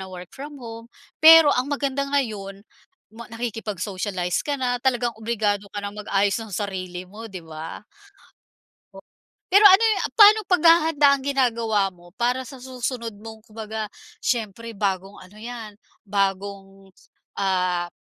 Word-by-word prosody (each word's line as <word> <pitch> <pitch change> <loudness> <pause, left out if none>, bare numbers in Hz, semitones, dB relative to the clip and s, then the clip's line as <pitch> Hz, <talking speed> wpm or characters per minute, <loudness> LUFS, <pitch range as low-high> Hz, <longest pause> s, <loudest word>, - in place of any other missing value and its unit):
na 190 0 -8
work 180 -1 -9
from 285 +1 -9
home. 230 0 -9 0.3
Pero 325 -1 +9
ang 255 +3 -1
maganda 280 -1 -1
ngayon 205 -8 -2 0.5
ma 235 0 -11
nakikipag-socialize 205 -5 -3
ka 290 -1 -2
na 245 -2 -1
talagang 245 -2 0
obligado 210 -3 -1
ka 205 0 -6
nang 200 - -5
mag-ayos 200 -1 0
ng 225 - -8
sarili 185 -2 -4
mo, 215 +4 -10
'di 185 -4 -9
ba? 160 +4 -8 1.7
Pero 400 +3 +6
ano 385 +2 +8
yu 440 -3 +3 0.2
paanong 425 -1 +7
paghahanda 325 -4 +4
ang 265 - -10
ginagawa 230 -7 +1
mo 175 -1 -19
para 250 +3 -1
sa 260 +1 -11
susunod 250 -3 -4
mong 220 0 -11
kumbaga, 220 0 -6 0.3
siyempre 230 -1 -2
bagong 195 -1 -2
ano 185 +3 -15
'yan, 230 -2 -8 0.3
bagong 195 -1 -3 0.4
ah, 180 -3 0
220 Hz, 135 wpm, -23 LUFS, 195-255 Hz, 1.7 s, Pero